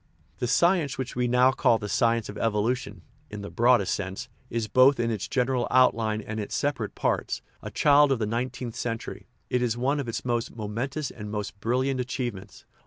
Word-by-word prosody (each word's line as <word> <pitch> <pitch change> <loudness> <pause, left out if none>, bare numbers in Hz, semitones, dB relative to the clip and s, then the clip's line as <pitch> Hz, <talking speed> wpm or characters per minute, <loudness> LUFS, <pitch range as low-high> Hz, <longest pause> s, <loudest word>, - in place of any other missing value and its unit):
The 125 - -1
science 160 +1 +2
which 130 -1 -4
we 125 0 +1
now 125 +2 +4
call 120 -2 +3
the 105 - -6
science 115 +2 +1
of 105 - -8
evolu 115 +3 +1
tion 125 - -10 0.3
(in 105 -1 -7
the 100 - -7
broadest 120 -5 +3
sense) 95 -1 -5 0.2
is, 115 -1 -2
both 130 +5 +5
in 115 0 +1
its 105 -4 -3
general 125 -1 0
out 130 0 +5
line 110 -1 -2
and 110 +1 -5
in - - -1
its - - -6
separate 140 -7 -2
parts, - - -1 0.2
a - - -6
child 145 -1 +4
of 135 - +2
the 110 - -1
nineteenth 120 +1 -3
century; 115 -1 -5 0.2
it 125 - +2
is 120 -1 0
one 135 +4 +1
of 140 - -3
its 115 - -4
most 120 -2 -1
momentous 120 +7 -3
and 105 -2 -8
most 105 -1 -5
brilliant 130 +4 0
achievements. 120 -6 -5
120 Hz, 205 wpm, -26 LUFS, 110-130 Hz, 0.3 s, both